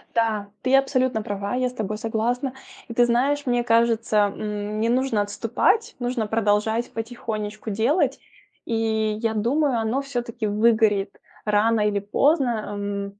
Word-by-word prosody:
Да, 220 Hz, -3 st, 0 dB
ты 260 Hz, +1 st, 0 dB
абсолютно 260 Hz, -4 st, +1 dB
права, 205 Hz, +1 st, -3 dB
я 255 Hz, 0 st, +1 dB
с 250 Hz, -, -6 dB
тобой 215 Hz, -3 st, -3 dB
согласна. 235 Hz, +4 st, -1 dB, 0.3 s
И 235 Hz, -, -7 dB
ты 240 Hz, +1 st, +4 dB
знаешь, 275 Hz, +5 st, +1 dB
мне 245 Hz, -2 st, +1 dB
кажется, 230 Hz, -1 st, +2 dB, 0.2 s
м, 210 Hz, 0 st, -4 dB
не 225 Hz, -, +1 dB
нужно 250 Hz, -2 st, +1 dB
отступать, 250 Hz, -, 0 dB
нужно 245 Hz, -2 st, -1 dB
продолжать 220 Hz, +2 st, +1 dB
потихонечку 220 Hz, -2 st, -5 dB
делать. 230 Hz, -, +1 dB, 0.5 s
И 220 Hz, -2 st, 0 dB
я 225 Hz, -1 st, 0 dB
думаю, 255 Hz, +5 st, +1 dB
оно 225 Hz, +5 st, 0 dB
всё-таки 240 Hz, -4 st, -4 dB
выгорит 210 Hz, -2 st, +2 dB, 0.2 s
рано 215 Hz, +1 st, +2 dB
или 210 Hz, -1 st, +1 dB
поздно. 270 Hz, +7 st, +2 dB, 0.3 s
Эм, 200 Hz, 0 st, -4 dB
225 Hz, 140 wpm, -23 LUFS, 210-245 Hz, 0.5 s, ты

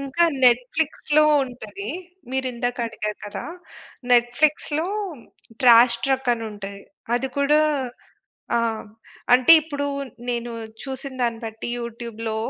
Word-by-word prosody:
ఇంకా 275 Hz, +5 st, +1 dB, 0.2 s
నెట్‌ఫ్లిక్స్‌లో 295 Hz, +5 st, +3 dB, 0.2 s
ఉంటది. 220 Hz, -5 st, -8 dB, 0.4 s
మీరిందాక 250 Hz, -2 st, -2 dB
అడిగారు 210 Hz, -2 st, -5 dB
కదా! 205 Hz, -, -6 dB, 0.7 s
నెట్‌ఫ్లిక్స్‌లో 290 Hz, +6 st, +2 dB, 0.7 s
'ట్రాష్ 235 Hz, -1 st, +7 dB
ట్రక్' 265 Hz, -2 st, +1 dB
అనుంటది. 205 Hz, -3 st, -7 dB, 0.3 s
అది 265 Hz, +2 st, -2 dB
కూడా 295 Hz, +2 st, +4 dB, 1.0 s
ఆ! -, -, +3 dB, 0.7 s
అంటే 255 Hz, +6 st, +7 dB
ఇప్పుడు 290 Hz, -2 st, -4 dB, 0.4 s
నేను 240 Hz, 0 st, -2 dB, 0.3 s
చూసిన 270 Hz, 0 st, -6 dB
దాన్ని 230 Hz, -1 st, -1 dB
బట్టి 225 Hz, +1 st, -6 dB
యూట్యూబ్‌లో, 230 Hz, -1 st, -5 dB
245 Hz, 95 wpm, -23 LUFS, 230-275 Hz, 1.0 s, ట్రాష్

